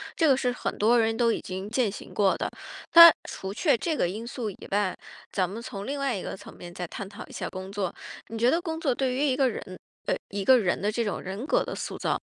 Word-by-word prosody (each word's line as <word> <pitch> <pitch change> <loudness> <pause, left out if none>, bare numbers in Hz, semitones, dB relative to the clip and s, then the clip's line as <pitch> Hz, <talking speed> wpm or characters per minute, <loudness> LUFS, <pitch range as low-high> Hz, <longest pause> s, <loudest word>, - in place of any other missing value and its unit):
这 325 - +3
个 270 -3 +5
是 250 -2 +1
很 245 - -4
多 230 +3 +4
人 225 0 +1
都 235 -2 +3
已 - - -2
经 190 +2 -6
践 235 -2 +1
行 - - -10
过 200 -2 +2
的。 - - -1 0.5
那 335 -1 +12 0.2
除 190 - -6
却 285 - +2
这 315 +6 -2
个 - - +2
因 215 +6 -5
素 235 -4 -4
以 - - -12
外， 200 -2 +1 0.4
咱 185 -2 0
们 215 +4 -6
从 210 -3 -7
另 280 0 -3
外 275 -4 0
一 190 - -4
个 - - -6
层 - - -12
面 175 0 -10
再 180 0 -5
探 195 +3 -7
讨 200 - -9
一 - - -16
下 - - -4
工 190 +1 -7
作。 200 -3 -2 0.4
你 225 - -6
觉 240 +3 +4
得 340 - +1
工 325 -2 -4
作 275 -6 +1
对 260 0 0
于 280 +3 +1
一 265 -3 +2
个 265 -2 +3
人， 185 -4 -7 0.3
呃， - - +1
一 195 -1 -4
个 260 -2 +7
人 180 -5 0
的 210 +2 0
这 235 +1 -1
种 205 - -2
人 200 +9 -6
格 - - +3
的 - - -5
塑 - - -5
造 - - -1
225 Hz, 290 characters per minute, -27 LUFS, 195-260 Hz, 0.5 s, 那